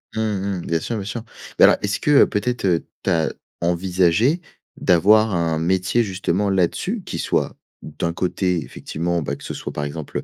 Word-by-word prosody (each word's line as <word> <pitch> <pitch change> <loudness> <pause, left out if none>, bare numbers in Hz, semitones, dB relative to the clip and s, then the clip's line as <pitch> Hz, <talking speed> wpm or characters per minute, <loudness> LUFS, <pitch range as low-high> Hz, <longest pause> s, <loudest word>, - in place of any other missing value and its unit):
Mmh 110 - 0
mh. 100 -4 -2
Bien 80 -1 +1
sûr, 115 - -4
bien 100 - -5
sûr. 110 +2 -5 0.3
Beh - - +5
alors - - +6
est-ce 100 0 -1
que, 150 - +1
heu, 140 - +7
peut-être, 115 +2 -1
heu, 85 -3 +1 0.2
tu - - 0
as 80 -3 +1 0.3
envisagé 90 - +2 0.4
d'avoir 105 +5 +4
un 85 -2 0
métier, 95 +7 +1
justement, 95 0 -1
là-dessus? 95 - 0
Qui 85 - -5
soit, - - -1 0.3
d'un 85 +2 -3
côté, 90 -1 0
effectivement, 85 +4 -3
bah, 70 -2 -3
que - - -15
ce - - -5
soit - - -6
par 75 - -3
exemple, 75 +1 -5
heu, - - -8
95 Hz, 195 wpm, -21 LUFS, 85-105 Hz, 0.4 s, heu